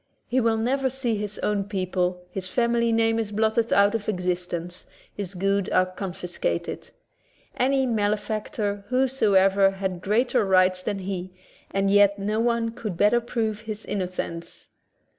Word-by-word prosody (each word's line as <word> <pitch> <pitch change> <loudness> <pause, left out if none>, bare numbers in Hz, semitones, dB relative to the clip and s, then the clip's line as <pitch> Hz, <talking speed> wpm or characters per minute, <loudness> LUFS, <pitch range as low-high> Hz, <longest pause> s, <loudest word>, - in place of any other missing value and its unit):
He 255 +1 +1
will 225 -1 +2
never 265 +4 +1
see 250 -3 -1
his 210 0 -4
own 205 -2 0
people, 185 -2 -1
his 185 0 -4
family 235 +2 +1
name 225 0 +2
is 215 -2 -3
blotted 220 +2 +1
out 200 +1 +5
of 220 -2 -2
existence, 180 -2 -3 0.3
his 200 -2 -6
goods 195 +1 0
are 185 - +3
con 185 +1 -5
fiscated. 175 - -4 0.7
Any 265 +1 +2
malefactor 210 -2 -1
whosoever 200 -7 +3
has 190 -2 -3
greater 220 +5 +2
rights 185 -1 +3
than 195 - -2
he, 185 -1 -5 0.4
and 195 0 +1
yet 200 0 +5
no 210 +2 -1
one 230 -1 +1
could 215 -6 -5
better 210 +5 +4
prove 225 -3 -2
his 215 -1 -7
innocence. 180 -3 -4
205 Hz, 145 wpm, -25 LUFS, 185-225 Hz, 0.7 s, out